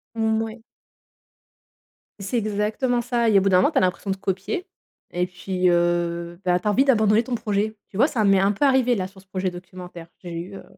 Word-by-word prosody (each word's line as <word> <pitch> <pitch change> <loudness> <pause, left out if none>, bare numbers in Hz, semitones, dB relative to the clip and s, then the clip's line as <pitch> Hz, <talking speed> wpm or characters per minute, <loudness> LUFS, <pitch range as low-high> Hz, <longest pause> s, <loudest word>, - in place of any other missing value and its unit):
Mmh 220 -1 +1
oui. 225 +1 -8 1.6
C'est 195 +5 -2
exactement 215 +3 0
ça 235 -1 +1
et 205 - +5
au - - -1
bout 195 - +2
d'un 185 - +5
moment, 185 - +3
tu - - -2
as - - +5
l'impression 185 +2 -1
de - - 0
copier 195 - -3 0.5
et 180 0 0
puis 180 0 -1
heu, 170 0 0
bah 180 0 +2
tu 195 - -5
as - - +3
envie 265 +6 +3
d'abandonner 220 -4 +4
ton 245 +1 -3
projet. 215 -1 -1
Tu 190 - -9
vois, 260 +6 +5
ça 245 -8 -1
m'est 195 -1 +4
un 195 +1 +3
peu 210 +8 0
arrivé 260 -3 +3
là 185 -3 -2
sur 190 0 -17
ce 195 - -28
projet 185 0 -2
documentaire. 180 -1 -10 0.2
J'ai 175 - -7
eu, 185 +4 -8
heu, - - -10
195 Hz, 225 wpm, -23 LUFS, 180-225 Hz, 1.6 s, et